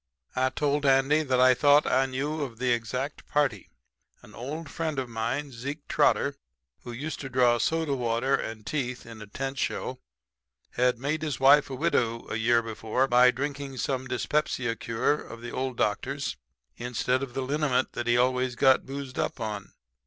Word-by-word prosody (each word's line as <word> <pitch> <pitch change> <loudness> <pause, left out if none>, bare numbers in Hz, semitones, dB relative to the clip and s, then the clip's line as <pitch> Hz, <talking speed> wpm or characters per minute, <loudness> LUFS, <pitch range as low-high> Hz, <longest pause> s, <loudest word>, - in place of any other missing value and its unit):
"I 130 +1 +2
told 145 +2 0
Andy 135 +2 +4
that 130 -4 +1
I 130 0 +7
thought 145 +3 +5
I 135 +1 +2
knew 145 +4 -3
of 125 -5 -5
the 125 +1 0
exact 125 +5 -3
party. 145 -3 0 0.5
An - - -15
old 150 +6 -6
friend 160 -2 -3
of 130 -1 -1
mine, 120 +5 -3
Zeke 140 +5 -6
Trotter, - - +2 0.4
who 120 - -8
used 145 +6 -5
to 135 - -6
draw 125 -2 +3
soda 160 +4 0
water 120 +1 0
and 110 -4 -2
teeth 125 -4 -3
in 115 -2 -10
a 105 - -9
tent 135 +5 -4
show, - - -2 0.7
had 125 0 +2
made 145 +5 -2
his 150 -5 -3
wife 140 +2 +6
a 135 - -4
widow 120 -7 0
a 110 - -1
year 115 +1 +3
before 115 +3 -1
by 125 0 +6
drinking 140 +1 -3
some 130 +1 -2
dyspepsia 125 -2 -1
cure 115 +7 0
of 115 - -10
the 120 0 -6
old 130 -1 -3
doctor's 135 - -1 0.4
instead 125 +2 -1
of 135 -3 -6
the 135 - -1
liniment 140 -1 0
that 120 0 -4
he 120 0 +4
always 125 0 +1
got 130 +2 +4
boozed 135 -1 -6
up - - -2
on. 105 -3 -5
130 Hz, 180 wpm, -27 LUFS, 120-140 Hz, 0.7 s, I